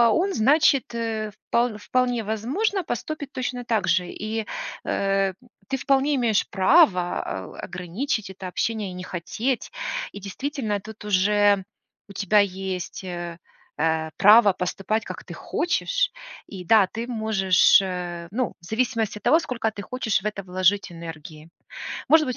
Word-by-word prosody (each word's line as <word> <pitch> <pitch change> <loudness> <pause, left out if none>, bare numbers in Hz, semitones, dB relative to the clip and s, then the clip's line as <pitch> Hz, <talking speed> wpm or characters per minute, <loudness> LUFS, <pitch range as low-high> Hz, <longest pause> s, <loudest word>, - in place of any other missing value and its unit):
он, 385 +3 +1
значит, 275 +1 +3
э, 220 -2 -2 0.2
впол 235 -2 +1
вполне 245 +1 0
возможно, 280 - -1
поступит 285 +2 -4
точно 250 -1 -3
так 220 -5 0
же 175 +1 +2
и, 220 +1 -4 0.4
э, 195 -1 +1 0.3
ты 270 - -1
вполне 275 +2 +2
имеешь 235 -5 +2
право, 190 - +4
а, 95 -1 -5
у, - - -12
ограничить 190 +6 -3
это 190 0 -8
общение 215 +2 -2
и 180 - -8
не 180 - -7
хотеть. 220 +9 -3 0.4
И, 205 - -7
действительно, 215 +1 -3
тут 215 +1 -11
уже 205 0 +3 0.5
у - - -10
тебя 205 +2 +3
есть, 190 -2 -2
э, 175 -2 -5 0.4
э, 160 0 0
право 210 0 +7
поступать, 195 +4 -2
как - - -7
ты - - -9
хочешь. - - 0 0.4
И 190 -3 -8
да, 210 +2 +5
ты 230 +4 -5
можешь, 215 -6 +4
э, 175 -2 -4
ну, 240 +5 -2
в - - -15
зависимости 225 0 -1
от - - -13
того, 320 - +5
сколько 245 -8 -2
ты 205 - -7
хочешь 225 -4 -1
в - - -15
это 200 -2 -4
вложить 185 +1 +1
энергии. 165 -1 -9 0.6
Может 315 0 +5
быть, 255 -2 -2
210 Hz, 155 wpm, -24 LUFS, 185-245 Hz, 0.6 s, право